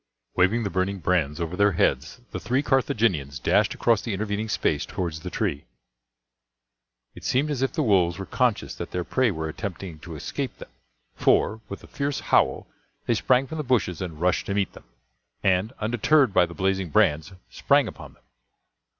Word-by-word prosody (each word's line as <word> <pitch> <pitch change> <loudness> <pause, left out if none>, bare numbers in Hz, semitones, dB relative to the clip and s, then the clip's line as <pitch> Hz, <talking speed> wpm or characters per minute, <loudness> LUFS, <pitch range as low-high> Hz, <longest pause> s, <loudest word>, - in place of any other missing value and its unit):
Waving 100 +6 +3
the 100 - -2
burning 95 +1 -1
brands 85 -4 0
over 85 +1 -3
their 100 +1 +3
heads, 75 - 0
the - - -4
three 130 +4 0
Carthaginians 105 - +1
dashed - - +2
across 115 -3 +2
the 115 - -3
intervening 105 +2 -3
space 75 -7 0
towards 85 -5 -4
the - - -6
tree. 70 - -2 1.5
It - - -13
seemed 145 +4 +1
as 135 -3 -2
if 135 - +1
the 155 - 0
wolves 90 -7 +3
were 95 - -5
conscious 125 +2 0
that - - -6
their 90 - -3
prey 130 +6 +1
were 80 -5 -3
attempting 90 0 -6
to 80 0 -9
escape 75 - -4
them; - - -11 0.4
for, 110 +1 +2
with 100 - -7
a - - -12
fierce 140 -1 -2
howl, - - +2 0.4
they - - +2
sprang 125 +4 +2
from 160 +4 -6
the - - -1
bushes 110 - 0
and 85 -5 -5
rushed 90 +2 +1
to 100 - -1
meet 100 -2 0
them; - - -14 0.6
and, 95 +4 +2
undeterred 120 +3 +2
by 90 - +4
the 85 - -10
blazing 95 -2 0
brands, 80 -2 +2 0.2
sprang - - +3
upon - - -10
them. - - -30
95 Hz, 185 wpm, -25 LUFS, 85-115 Hz, 1.5 s, by